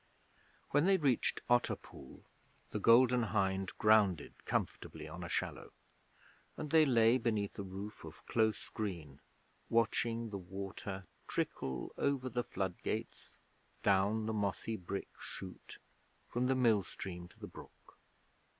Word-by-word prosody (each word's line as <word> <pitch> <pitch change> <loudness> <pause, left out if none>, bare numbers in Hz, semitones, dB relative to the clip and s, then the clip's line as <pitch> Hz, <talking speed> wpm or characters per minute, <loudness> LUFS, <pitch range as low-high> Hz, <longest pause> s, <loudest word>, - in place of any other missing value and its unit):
When 145 +5 +4
they 195 -1 +6
reached 140 -8 +1
Otter 120 0 +3
Pool - - -13 0.5
the 105 - -2
Golden 125 +3 +6
Hind 95 -3 0
grounded 105 -7 +4
comfortably - - -2
on - - -7
a - - -5
shallow, - - -3 0.8
and 150 - -4
they 160 -2 +6
lay 115 0 +5
beneath 110 -5 -1
a - - 0
roof 100 +2 -7
of 80 -1 -11
close 110 -2 +1
green, 85 -10 -5 0.5
watching 115 0 +1
the 100 - -3
water 95 +1 -6 0.2
trickle 65 -2 -2
over 135 -2 +1
the 120 0 -1
flood 95 -7 -3
gates - - -4 0.5
down 100 +2 +3
the 110 - -1
mossy 105 +2 -1
brick 100 0 -5
chute 95 -1 -8 0.5
from 125 +1 0
the 130 - +3
mill 115 -6 +4
stream 90 -1 -7
to - - -21
the - - -6
brook. - - -14
110 Hz, 135 wpm, -35 LUFS, 95-120 Hz, 0.8 s, they